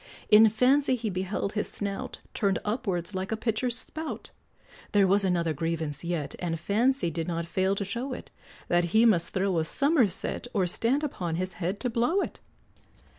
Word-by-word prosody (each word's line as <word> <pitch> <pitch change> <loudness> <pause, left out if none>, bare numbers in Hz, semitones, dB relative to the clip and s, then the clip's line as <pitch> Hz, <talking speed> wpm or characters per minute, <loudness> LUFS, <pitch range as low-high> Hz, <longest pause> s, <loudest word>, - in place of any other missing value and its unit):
In 215 +1 +8
fancy 260 +5 +3
he 225 -3 -3
beheld 190 +2 -2
his 210 - -1
snout 200 -1 -5
Turned 195 -3 +1
upwards 205 -5 -2
like 190 +2 -3
a 220 - 0
pitcher's 230 +2 -1
spout; 315 0 -6 0.6
There 200 -1 +5
was 195 +2 +3
another 170 -4 +1
grievance 160 0 -3
yet, 170 -4 -2
And 165 -2 -2
fancy 225 - +1
did 165 +1 -3
not 170 -1 -2
fail 190 +3 +1
to 200 - -2
show 235 +7 -4
it, 255 - -7 0.4
That 175 0 +3
he 225 +2 +7
must 175 -7 +3
throw 190 -2 +1
a - - +1
summerset, 245 - +1
Or 190 -3 +3
stand 235 - +1
upon 175 - -2
his 185 +2 -2
head 185 +4 -1
to 250 - 0
blow 240 - +2
it. - - -5
200 Hz, 175 wpm, -28 LUFS, 175-235 Hz, 0.6 s, In